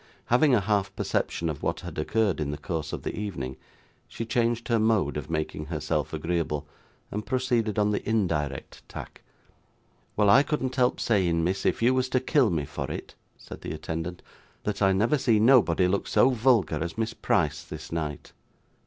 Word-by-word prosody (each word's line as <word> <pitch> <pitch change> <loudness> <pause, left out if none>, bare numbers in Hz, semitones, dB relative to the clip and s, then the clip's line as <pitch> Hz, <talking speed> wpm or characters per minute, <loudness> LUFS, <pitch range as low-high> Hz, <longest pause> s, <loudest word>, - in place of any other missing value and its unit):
Having 135 +1 +5
a 105 - +2
half 100 -1 0
perception 85 - -1
of 75 -4 -4
what - - -2
had - - -7
occurred 100 +2 +1
in 75 -2 -2
the 75 - -3
course 80 -1 -4
of - - -5
the - - -3
evening, 65 -12 -4 0.5
she 115 - -5
changed 115 0 0
her 115 -2 +2
mode 110 -9 +2
of 75 +1 -5
making 80 -1 -3
herself 75 -1 -2
agreeable, 80 -2 -2 0.5
and 105 +1 -3
proceeded 120 -4 0
on 105 0 +3
the 105 - -1
indirect 75 -11 -1
tack. - - -9 1.0
'Well, 105 -1 +4
I 115 +7 +7
couldn't 135 -4 -2
help 125 -2 +2
saying, 90 -7 +2
miss, 95 +3 0
if - - 0
you 125 +2 +5
was 130 0 0
to 130 - +2
kill 130 -2 +3
me 80 -5 -1
for - - -5
it,' - - -6 0.2
said - - -11
the - - -5
attendant, 80 +3 -5 0.4
'that 105 -1 -3
I 95 -1 +5
never 110 +10 +2
see 115 -4 +3
nobody 105 -7 +5
look 100 +2 0
so 135 - +4
vulgar 110 - +2
as 85 +3 -5
Miss 115 0 -1
Price - - 0
this - - -9
night. 75 -3 -4
100 Hz, 185 wpm, -27 LUFS, 80-115 Hz, 1.0 s, I